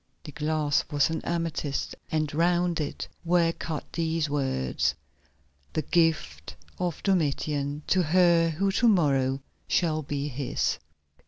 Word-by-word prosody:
The 155 - -8
clasp 150 +1 0
was 145 +2 +2
an 160 - -2
amethyst, 165 -4 -2 0.2
and 155 -2 0
round 175 +1 +2
it 145 - -4 0.2
were 170 -1 +3
cut 160 -3 -5
these 160 -2 0
words: 130 - 0 0.8
"The 155 - 0
gift 160 - 0 0.2
of 175 -3 -2
Domitian 150 -5 0
to 185 - +3
her 170 0 +4
who 195 +5 0
to 235 +5 +3
morrow 135 - +2 0.2
shall 155 -3 +1
be 140 0 -3
his." 140 -1 -1
155 Hz, 130 wpm, -27 LUFS, 145-170 Hz, 0.8 s, her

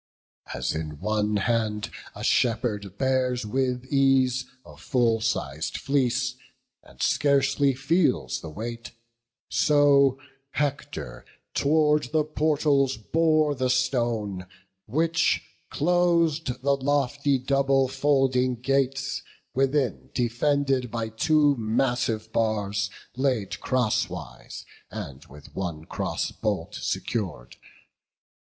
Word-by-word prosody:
As - - -2
in 75 -2 -5
one 105 +1 0
hand 105 -1 -1 0.2
a - - -7
shepherd 110 -5 0
bears 130 -2 +1
with 125 +2 -1
ease 130 -2 +2 0.2
A - - -13
full 120 -4 +1
siz'd 75 -6 -2
fleece, 130 -2 0 0.4
and 65 - -19
scarcely 140 -1 +2
feels 160 +6 +1
the 80 - -7
weight; 115 +8 -7 0.6
So 140 -3 +4 0.4
Hector 135 - -3 0.3
tow'rd 150 0 +3
the 155 -1 +2
portals 145 -4 +1
bore 155 +5 +2
the 130 -2 -1
stone, 120 -7 0 0.4
Which 165 +7 +1 0.3
clos'd 165 -5 +1
the 140 0 +3
lofty 140 0 +1
double 135 0 +2
folding 135 -2 +2
gates, 135 +1 0 0.3
Within 135 0 0
defended 130 +1 +1
by 115 0 -3
two 145 +5 +3
massive 110 -1 0
bars 105 -2 0 0.3
Laid 125 -6 -1
crosswise, 110 - -2 0.2
and 70 -1 -7
with 75 +1 -15
one 85 -5 -4
cross - - -3
bolt - - -3
secur'd. 85 - -3
130 Hz, 100 wpm, -26 LUFS, 110-140 Hz, 0.6 s, So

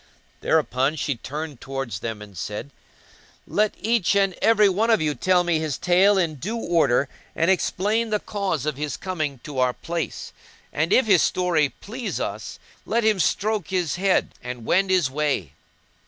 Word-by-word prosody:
Thereupon 135 +5 +1
she 145 -1 -1
turned 145 +3 -7
towards 135 -8 -4
them 110 -1 -5
and 100 -2 -14
said, 105 - -5 0.7
"Let 210 0 +1
each 225 -3 +1
and 195 -1 +3
every 225 -2 +5
of 220 +4 +2
you 150 -1 0
tell 180 +3 +2
me 170 -2 +1
his 155 -3 -2
tale 190 +3 +4
in 165 -5 0
due 210 - -4
order 165 - +2 0.3
and 165 +3 +3
explain 210 +4 0
the 210 -1 +1
cause 195 - -2
of 150 -3 -2
his 150 0 -3
coming 155 -9 -3
to 145 -3 -5
our 125 -1 +2
place; 170 +2 -5 0.4
and 160 +4 0
if 260 - +5
his 195 -6 +5
story 170 -5 +2
please 230 - -6
us - - -5 0.3
let 235 0 0
him 215 -3 +3
stroke 210 +6 0
his 180 -4 -1
head[FN#189] 190 +1 +2
and 125 -2 -7
wend 190 +7 +2
his 180 -8 +2
way." 140 - -1
170 Hz, 170 wpm, -23 LUFS, 140-200 Hz, 0.7 s, every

